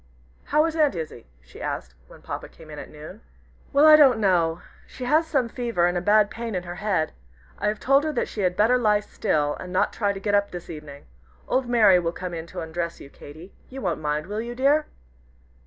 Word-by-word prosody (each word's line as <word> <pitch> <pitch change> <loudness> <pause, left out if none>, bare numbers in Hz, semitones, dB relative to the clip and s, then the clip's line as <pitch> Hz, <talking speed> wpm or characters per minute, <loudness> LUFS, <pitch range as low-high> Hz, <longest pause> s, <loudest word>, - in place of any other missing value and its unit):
"How 300 +2 +3
is 325 -1 -2
Aunt 300 - +2
Izzie?" 155 -8 -7 0.2
she 60 - -14
asked, 65 - -4
when - - -16
Papa - - -6
came 160 -1 -15
in 150 - -8
at - - -9
noon. 155 +8 -11 0.5
"Well, 285 +2 +5
I 310 0 +10
don't 275 -6 +6
know. 175 -5 +1 0.2
She 255 - -9
has 310 +5 +3
some 265 -6 +1
fever 230 -7 -1
and 175 0 +1
a 175 - 0
bad 210 +2 +4
pain 230 -2 -5
in 180 - -2
her 175 0 -7
head. 190 -7 -1 0.5
I - - -1
have 210 0 -1
told 275 +2 +3
her 310 - 0
that 245 - -1
she 210 - -5
had 180 -1 0
better 235 +4 +4
lie 210 -3 +3
still, 150 -8 -1
and 180 - -8
not 185 - +1
try 205 -2 0
to 195 - -6
get 205 +1 -2
up 200 0 +3
this 175 -1 -8
evening. 150 -3 -10 0.4
Old 255 -2 0
Mary 210 -6 +5
will 170 -1 -2
come 180 -1 -6
in 165 0 -6
to 180 - -7
undress 165 +1 -4
you, 140 - -12
Katy. 160 +6 -13 0.2
You 265 +1 -8
won't 175 -5 -2
mind, 150 0 -1
will 210 +4 -4
you, 240 +1 -6
dear?" 285 +4 +2
200 Hz, 230 wpm, -24 LUFS, 170-240 Hz, 0.5 s, I